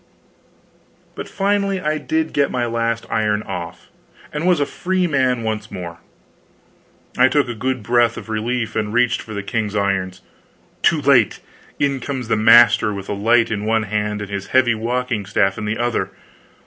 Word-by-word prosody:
But -, -, -7 dB
finally 200 Hz, -1 st, 0 dB
I 155 Hz, -2 st, -1 dB
did 320 Hz, -, -1 dB
get 140 Hz, -1 st, +2 dB
my 125 Hz, -1 st, -1 dB
last 115 Hz, 0 st, -1 dB
iron 105 Hz, -1 st, 0 dB
off, 90 Hz, -4 st, -7 dB, 0.4 s
and 150 Hz, +4 st, -2 dB
was 180 Hz, -4 st, +3 dB
a 145 Hz, -, +2 dB
free 185 Hz, +5 st, -1 dB
man 130 Hz, -6 st, +1 dB
once 110 Hz, -1 st, -3 dB
more. 85 Hz, -1 st, -7 dB, 1.2 s
I -, -, +7 dB
took 140 Hz, 0 st, +1 dB
a 120 Hz, -, -3 dB
good 125 Hz, +1 st, -3 dB
breath 120 Hz, +1 st, +2 dB
of -, -, -8 dB
relief, 115 Hz, +2 st, -2 dB
and 105 Hz, -1 st, -1 dB
reached 120 Hz, 0 st, +2 dB
for 110 Hz, -, -9 dB
the 100 Hz, -, -4 dB
king's 105 Hz, 0 st, -2 dB
irons. 95 Hz, -2 st, -1 dB, 0.6 s
Too 160 Hz, -3 st, +3 dB
late! 125 Hz, -7 st, +4 dB, 0.4 s
in 140 Hz, -2 st, 0 dB
comes 130 Hz, -2 st, -5 dB
the -, -, +3 dB
master, 110 Hz, 0 st, +6 dB
with 100 Hz, -1 st, -7 dB
a -, -, -1 dB
light 115 Hz, +4 st, +2 dB
in 105 Hz, -1 st, -2 dB
one 110 Hz, +1 st, +1 dB
hand 105 Hz, 0 st, -2 dB
and 100 Hz, -, -9 dB
his 100 Hz, -1 st, -4 dB
heavy 130 Hz, -2 st, +3 dB
walking 120 Hz, 0 st, -2 dB
staff 95 Hz, 0 st, +1 dB
in 105 Hz, -, -4 dB
the 105 Hz, +1 st, -2 dB
other. 120 Hz, -1 st, -1 dB
115 Hz, 175 wpm, -20 LUFS, 105-130 Hz, 1.2 s, I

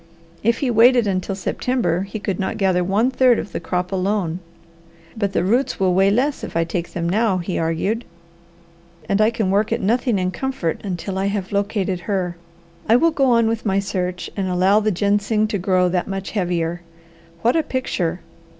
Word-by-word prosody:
If 230 Hz, +1 st, +2 dB
he 250 Hz, -, +1 dB
waited 240 Hz, +1 st, +5 dB
until 190 Hz, 0 st, -1 dB
September 190 Hz, -3 st, -1 dB
he 195 Hz, +2 st, -5 dB
could 200 Hz, -3 st, -3 dB
not 190 Hz, -, -2 dB
gather 185 Hz, -2 st, +2 dB
one 210 Hz, +8 st, +1 dB
third 255 Hz, -2 st, +4 dB
of 200 Hz, -, -5 dB
the -, -, -3 dB
crop 180 Hz, 0 st, -2 dB
alone. 190 Hz, -3 st, -1 dB, 0.8 s
"But 200 Hz, -3 st, -1 dB
the 175 Hz, -, +1 dB
roots 240 Hz, +9 st, +1 dB
will 185 Hz, -2 st, +2 dB
weigh 195 Hz, +2 st, +4 dB
less 265 Hz, +7 st, 0 dB
if -, -, -4 dB
I 165 Hz, -, +3 dB
take 170 Hz, +1 st, -4 dB
them 170 Hz, -1 st, -2 dB
now," 205 Hz, +1 st, +2 dB
he 180 Hz, +1 st, -3 dB
argued, 165 Hz, +8 st, -1 dB, 1.0 s
"and 200 Hz, +2 st, +2 dB
I 215 Hz, -, +5 dB
can 220 Hz, -5 st, -1 dB
work 205 Hz, +2 st, +1 dB
at -, -, +1 dB
nothing 235 Hz, +2 st, +1 dB
in 185 Hz, -1 st, 0 dB
comfort 225 Hz, -6 st, -3 dB
until 190 Hz, 0 st, -4 dB
I 195 Hz, -, 0 dB
have 200 Hz, -2 st, -3 dB
located 200 Hz, -2 st, -1 dB
her. 180 Hz, -1 st, -2 dB, 0.5 s
I 225 Hz, -, +6 dB
will 330 Hz, +7 st, +4 dB
go 280 Hz, -3 st, +1 dB
on 230 Hz, -3 st, +4 dB
with 225 Hz, 0 st, -1 dB
my 195 Hz, -3 st, +1 dB
search 180 Hz, -2 st, -2 dB
and 195 Hz, -2 st, -2 dB
allow 185 Hz, +3 st, +3 dB
the 215 Hz, 0 st, +1 dB
ginseng 205 Hz, +2 st, +1 dB
to 205 Hz, -, -1 dB
grow 185 Hz, 0 st, +2 dB
that 180 Hz, 0 st, -1 dB
much 195 Hz, -1 st, -4 dB
heavier. 175 Hz, -3 st, -1 dB, 0.6 s
What 240 Hz, +5 st, +3 dB
a 325 Hz, -, +4 dB
picture! 185 Hz, -, -2 dB
195 Hz, 195 wpm, -21 LUFS, 180-225 Hz, 1.0 s, I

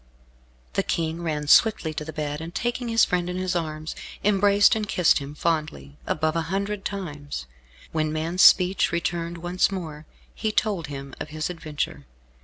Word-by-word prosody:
The -, -, +2 dB
King 165 Hz, 0 st, -2 dB
ran 155 Hz, -3 st, -2 dB
swiftly 160 Hz, -1 st, +4 dB
to 150 Hz, -, -4 dB
the 160 Hz, -, -6 dB
bed 150 Hz, -1 st, -4 dB
and 165 Hz, +2 st, -8 dB
taking 240 Hz, 0 st, -2 dB
his 230 Hz, -1 st, +4 dB
friend 180 Hz, -1 st, -1 dB
in 180 Hz, -, -3 dB
his 185 Hz, 0 st, -1 dB
arms, 155 Hz, -2 st, -3 dB, 0.3 s
embraced 205 Hz, 0 st, +5 dB
and 215 Hz, -1 st, -2 dB
kissed 180 Hz, -3 st, +4 dB
him 140 Hz, +1 st, -8 dB
fondly, 155 Hz, -3 st, -2 dB
above 155 Hz, +1 st, 0 dB
a 165 Hz, -, +1 dB
hundred 200 Hz, +1 st, -2 dB
times. 145 Hz, -, -5 dB, 0.5 s
When 155 Hz, -1 st, 0 dB
man's 165 Hz, +4 st, -1 dB
speech 185 Hz, +1 st, +6 dB
returned 170 Hz, 0 st, -2 dB
once 175 Hz, +3 st, +1 dB
more, 160 Hz, -5 st, -6 dB, 0.3 s
he 220 Hz, -, -2 dB
told 200 Hz, -7 st, 0 dB
him 140 Hz, -1 st, -7 dB
of 155 Hz, -, -5 dB
his 155 Hz, +2 st, -3 dB
adventure. 150 Hz, -, -4 dB
165 Hz, 170 wpm, -25 LUFS, 155-190 Hz, 0.5 s, speech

